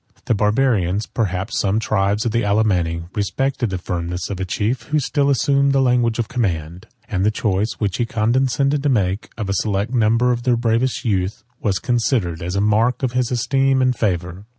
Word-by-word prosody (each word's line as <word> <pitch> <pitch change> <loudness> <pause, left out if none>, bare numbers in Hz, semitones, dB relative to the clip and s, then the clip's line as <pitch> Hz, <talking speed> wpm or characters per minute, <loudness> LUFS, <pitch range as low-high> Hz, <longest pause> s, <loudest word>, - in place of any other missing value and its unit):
35 - - -32
The - - +2
Barbarians, 105 -3 +1
perhaps 100 0 -2
some 100 +2 +1
tribes 105 0 0
of 115 - 0
the 115 +1 +1
Alemanni, 95 -6 +1
respected 130 +4 -1
the 95 - -2
firmness 90 0 -4
of 95 - -4
a 95 - -2
chief, 110 +7 -1
who 150 - +1
still 140 +1 0
assumed 140 +1 +2
the 135 - +3
language 125 -3 +2
of 120 -2 -1
command; 90 -7 -3 0.2
and 95 -6 -1
the 105 - +4
choice 105 0 -1
which 100 -4 -1
he 120 - 0
condescended 130 +5 +1
to 145 - +1
make, 105 -3 0
of 105 -3 -3
a 100 - 0
select 100 +3 -1
number 115 +1 +3
of 120 -1 -1
their 120 -1 +2
bravest 120 +3 0
youth, 100 0 -1 0.2
was 100 -4 0
considered 115 - 0
as 90 +2 -3
a 100 - +1
mark 110 +5 +2
of 130 - +1
his 125 -1 0
esteem 135 +2 +1
and 130 -1 +2
favor. 90 -2 -2
110 Hz, 195 wpm, -20 LUFS, 95-125 Hz, 0.2 s, the